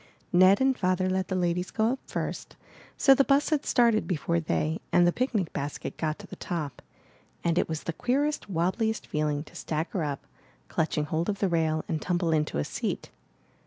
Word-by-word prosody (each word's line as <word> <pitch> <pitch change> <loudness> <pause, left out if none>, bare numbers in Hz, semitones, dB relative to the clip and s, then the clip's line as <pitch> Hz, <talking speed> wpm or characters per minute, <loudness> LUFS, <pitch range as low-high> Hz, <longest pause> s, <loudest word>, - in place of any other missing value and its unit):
Ned 185 +2 +6
and 265 0 +3
Father 185 -3 +1
let 185 0 0
the 185 - -2
ladies 180 0 0
go 220 +1 +1
up 265 - -3
first, - - -4 0.4
so 275 - +7
the 275 - +4
bus 280 +3 +2
had 300 -2 +1
started 235 -3 +3
before 170 -1 0
they 160 0 -1
and 175 0 +5
the 175 - +4
picnic 225 - -1
basket 140 +1 -4
got 155 -1 -1
to - - -11
the - - -9
top, 155 -6 -4 0.6
and 170 -1 +2
it - - +1
was 160 -1 -3
the 170 - -3
queerest, 280 - 0
wobbliest 190 +6 0
feeling 150 -1 -1
to - - -17
stagger 160 +3 -2
up, 145 -2 -4 0.4
clutching 155 -1 0
hold 160 +4 -1
of 200 - -1
the 195 - +1
rail, 160 -2 +1
and 160 - -2
tumble 175 -2 0
into 150 - +1
a 75 - +1
seat. - - -4
175 Hz, 195 wpm, -28 LUFS, 160-215 Hz, 0.6 s, so